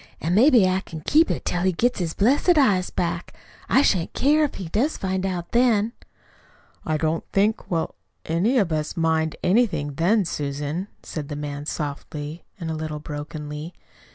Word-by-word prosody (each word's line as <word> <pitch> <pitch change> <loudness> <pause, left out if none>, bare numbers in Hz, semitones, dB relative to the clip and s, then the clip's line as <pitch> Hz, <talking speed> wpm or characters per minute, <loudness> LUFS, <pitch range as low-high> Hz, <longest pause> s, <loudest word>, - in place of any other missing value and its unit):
"An' 165 +3 -1
maybe 235 -1 +6
I 185 +1 +1
can 160 -5 -9
keep 310 - +4
it - - -2
till 175 - -1
he 185 +1 +3
gets 245 +7 +1
his 170 -3 -2
blessed 285 - +3
eyes 200 -10 +3
back. 170 -1 -3 0.3
I 270 - +5
shan't 180 -10 +1
care 300 +3 +3
if 295 - -1
he 185 - -6
does 240 - 0
find 190 0 -1
out 175 -2 -4
then." 235 -2 +3 0.9
"I 155 -1 0
don't 160 +1 0
think 210 +3 +1
we'll 165 -2 -1 0.3
any 190 +11 +1
of 195 -8 +2
us 155 +1 -2
mind 160 -1 +1
anything 180 -9 +2
then, 185 +7 +2
Susan," 145 +4 -3 0.2
said 150 -3 -5
the 145 - -4
man 145 0 -5
softly, 150 +2 -5 0.2
a 170 - -5
little 155 -1 -3
brokenly. 150 +2 -6
175 Hz, 170 wpm, -24 LUFS, 155-210 Hz, 0.9 s, maybe